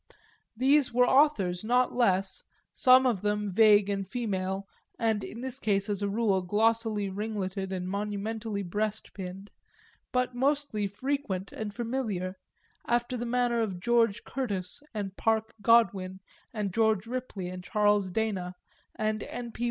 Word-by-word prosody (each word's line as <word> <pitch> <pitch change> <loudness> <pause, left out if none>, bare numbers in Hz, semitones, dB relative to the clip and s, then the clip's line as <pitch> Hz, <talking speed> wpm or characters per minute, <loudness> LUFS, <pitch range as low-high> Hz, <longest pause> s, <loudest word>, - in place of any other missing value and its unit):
There 275 +5 +5
were 250 0 +5
authors 220 -12 +3
not 245 +3 +2
less, 195 -5 +1 0.3
some 255 0 +6
of 230 -7 +1
them 210 -1 -1
vague 210 0 +6
and 195 -1 -2
female 195 -4 -2 0.3
and 220 -3 0
in 230 - -7
this 260 +1 -3
case, 200 -2 +1
as 205 -1 -1
a 200 - 0
rule, 200 -2 +1
glossily 215 +2 +1
ringletted 195 -1 -3
and 180 -1 -3
monumentally 210 +1 -3
breastpinned, 200 -1 -4 0.6
but 250 0 0
mostly 265 -5 0
frequent 205 -3 -3
and 215 -1 -5
familiar, 215 -6 -3 0.5
after 240 +1 0
the 240 0 -3
manner 240 -1 +1
of 195 -5 -2
George 230 +1 +2
Curtis 210 -2 -3
and 200 -3 -4
Parke 220 0 +1
Godwin 195 -5 +3 0.3
and 205 -4 -3
George 220 -2 +2
Ripley 235 -6 -5
and 180 0 -7
Charles 205 -1 +2
Dana 185 -3 -2 0.4
and 215 0 -1
N. 240 -1 -6
P. - - -14
210 Hz, 140 wpm, -29 LUFS, 195-235 Hz, 0.6 s, some